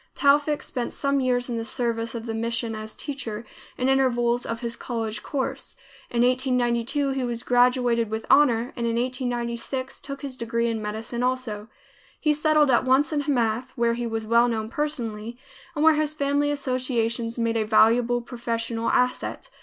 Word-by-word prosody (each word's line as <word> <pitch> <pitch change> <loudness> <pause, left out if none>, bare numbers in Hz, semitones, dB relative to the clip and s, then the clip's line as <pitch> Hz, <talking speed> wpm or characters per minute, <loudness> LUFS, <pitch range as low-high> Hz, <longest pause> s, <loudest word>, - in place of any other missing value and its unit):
Towfik 290 +1 +3
spent 245 -3 -3
some 280 0 0
years 250 -1 +1
in 240 -2 -3
the 225 - -2
service 230 0 -2
of 230 0 -5
the 225 - -3
mission 230 0 -2
as 215 0 -6
teacher, 240 -6 -5 0.3
in 255 - 0
intervals 245 -3 +2
of 230 +1 -4
his 235 -1 -2
college 225 -3 -4
course. 270 -3 -4 0.3
In 235 0 +1
1892 250 +2 +1
he 265 -1 -1
was 240 -1 -3
graduated 245 -2 +3
with 220 +1 -4
honor, 245 -4 +4
and 235 -1 -2
in 230 - 0
1896 245 +1 -2
took 275 +1 -8
his 275 -2 -5
degree 235 -1 -1
in 225 -1 -2
medicine 220 +3 -4
also. 250 -4 -2 0.5
He 305 -1 +2
settled 300 -1 +3
at 240 - +4
once 265 +4 +3
in 295 - +1
Hamath, 255 -3 0
where 235 0 +2
he 240 0 -3
was 225 -1 -3
well 235 +2 +4
known 220 -2 -2
personally, 235 -5 -3 0.4
and 295 - 0
where 320 - +8
his 305 0 0
family 285 0 +1
associations 250 -4 -1
made 230 -1 0
a 225 - +2
valuable 230 +3 +4
professional 230 -1 -3
asset. 250 - 0
240 Hz, 170 wpm, -25 LUFS, 230-265 Hz, 0.5 s, where